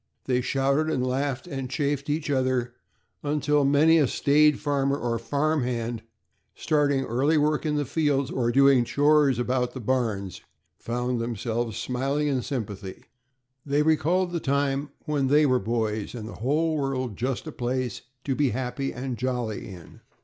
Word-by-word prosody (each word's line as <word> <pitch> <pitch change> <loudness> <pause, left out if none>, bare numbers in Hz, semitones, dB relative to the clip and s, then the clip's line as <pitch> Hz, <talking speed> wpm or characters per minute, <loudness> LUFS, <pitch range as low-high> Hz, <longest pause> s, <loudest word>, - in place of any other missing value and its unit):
They 125 -1 +1
shouted 140 +4 +1
and 130 -5 0
laughed, 135 +2 -1
and 135 -6 -5
chaffed 140 +1 -1
each 150 0 -1
other 130 -2 0 0.5
until 150 0 +1
many 150 +4 +5
a 145 - +3
staid 150 +3 +3
farmer 140 -1 0
or 120 -3 -2
farm 145 +6 0
hand, 120 -2 -2 0.5
starting 145 -3 +1
early 135 +7 +1
work 150 +1 +1
in 150 - 0
the 145 -1 0
fields, 140 -2 0
or 120 -2 0
doing 135 -1 +5
chores 145 0 +3
about 125 0 0
the - - -4
barns, 110 -6 -2 0.4
found 125 +1 -2
themselves 115 0 -2
smiling 135 +5 -1
in 135 -3 0
sympathy. 105 -7 -5 0.6
They 145 +1 +1
recalled 165 +4 +2
the 170 - -1
time 140 0 0 0.2
when 145 -4 0
they 150 +3 +4
were 130 -2 +3
boys, 110 0 -2
and 110 -3 -6
the - - -8
whole 155 +5 +1
world 130 -5 -2
just 130 +5 -2
a 155 - -6
place 125 -2 -3 0.2
to 135 - -1
be 140 0 +1
happy 130 +3 -3
and 125 -1 -5
jolly 125 -4 -2
in. 90 -4 -12
135 Hz, 160 wpm, -26 LUFS, 120-145 Hz, 0.6 s, many